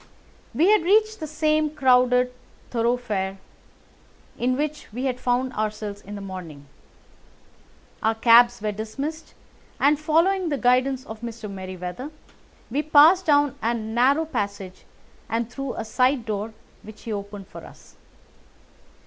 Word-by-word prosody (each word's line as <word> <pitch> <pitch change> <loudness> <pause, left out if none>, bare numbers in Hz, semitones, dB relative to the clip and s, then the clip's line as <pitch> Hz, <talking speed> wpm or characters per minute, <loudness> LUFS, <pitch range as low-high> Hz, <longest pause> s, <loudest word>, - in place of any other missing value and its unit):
We 350 +7 +4
had 425 - +5
reached 430 +5 +2
the 310 - -5
same 305 0 +1
crowded 250 -3 +3 0.4
thoroughfare 230 -5 -1 1.0
in 255 +1 0
which 300 -2 -4
we 250 +5 -4
had 255 -1 -1
found 250 +1 0
ourselves 210 -1 -4
in 205 +1 -9
the 200 - -7
morning. 180 -7 -8 1.4
Our 225 +1 +1
cabs 235 0 +5
were 210 - 0
dismissed, 275 +10 -6 0.4
and, 290 +1 +3
following 335 +4 +2
the 285 - -1
guidance 255 +1 +2
of 220 -3 -9
Mr. 230 -2 -6
Merryweather, 185 +5 -6 0.6
we 280 +5 +1
passed 310 +5 +5
down 290 -2 +4
a 235 +1 0
narrow 240 +8 +1
passage 200 -8 -5 0.4
and 230 0 -1
through 275 -1 -5
a - - -4
side 250 +2 +1
door, 215 0 -4 0.3
which 215 0 -13
he 225 - -4
opened 200 -1 -7
for - - -11
us. - - -16
245 Hz, 135 wpm, -24 LUFS, 215-290 Hz, 1.4 s, had